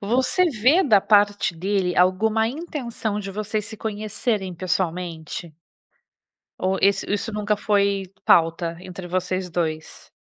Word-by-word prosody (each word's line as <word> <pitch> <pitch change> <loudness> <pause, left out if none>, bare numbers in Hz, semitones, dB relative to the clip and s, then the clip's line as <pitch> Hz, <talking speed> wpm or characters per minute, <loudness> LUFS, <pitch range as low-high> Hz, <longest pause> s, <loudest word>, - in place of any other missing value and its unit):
você 255 - +2
vê 265 - +4
da 215 - +5
parte 205 -2 +3
dele 185 +1 -1
alguma 215 +5 +3
intenção 240 -8 -4
de 195 -1 -6
vocês 215 +1 -3
se 220 - -9
conhecerem 210 -2 -2
pessoalmente? 170 -2 -3 1.0
Ou 190 +1 0
esse 200 +1 +2
isso 205 +2 -1
nunca 210 0 0
foi 200 -2 +1 0.2
pauta 165 0 +3
entre 185 0 -8
vocês 185 0 -2
2? 160 -2 -4
200 Hz, 125 wpm, -23 LUFS, 180-215 Hz, 1.0 s, da